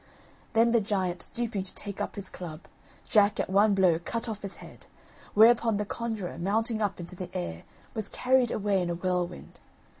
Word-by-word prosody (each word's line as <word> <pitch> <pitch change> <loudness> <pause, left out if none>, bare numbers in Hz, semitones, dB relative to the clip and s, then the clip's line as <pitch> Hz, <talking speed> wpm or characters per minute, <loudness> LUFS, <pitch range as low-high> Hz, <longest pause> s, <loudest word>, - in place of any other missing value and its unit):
Then 230 +1 +4
the 235 -1 +4
giant 190 -4 -1
stooping 230 -4 -3
to 185 - -5
take 200 -1 -4
up - - -3
his 200 -2 -5
club, 170 -4 -8 0.5
Jack 205 -2 +4
at - - -1
one 205 +1 +5
blow 180 -4 +4
cut 230 +7 -3
off 215 -2 -4
his 200 -1 -5
head; - - -13 0.5
whereupon 225 0 +6
the 210 - -1
conjurer, 220 -5 -4
mounting 220 +5 0
up 205 -3 -1
into 175 +1 -7
the 180 0 -6
air, 85 -1 -5 0.3
was 220 -3 -3
carried 255 -1 +2
away 200 -3 +1
in 175 - -1
a 170 - -1
whirlwind. 180 0 -3
200 Hz, 185 wpm, -28 LUFS, 180-225 Hz, 0.5 s, whereupon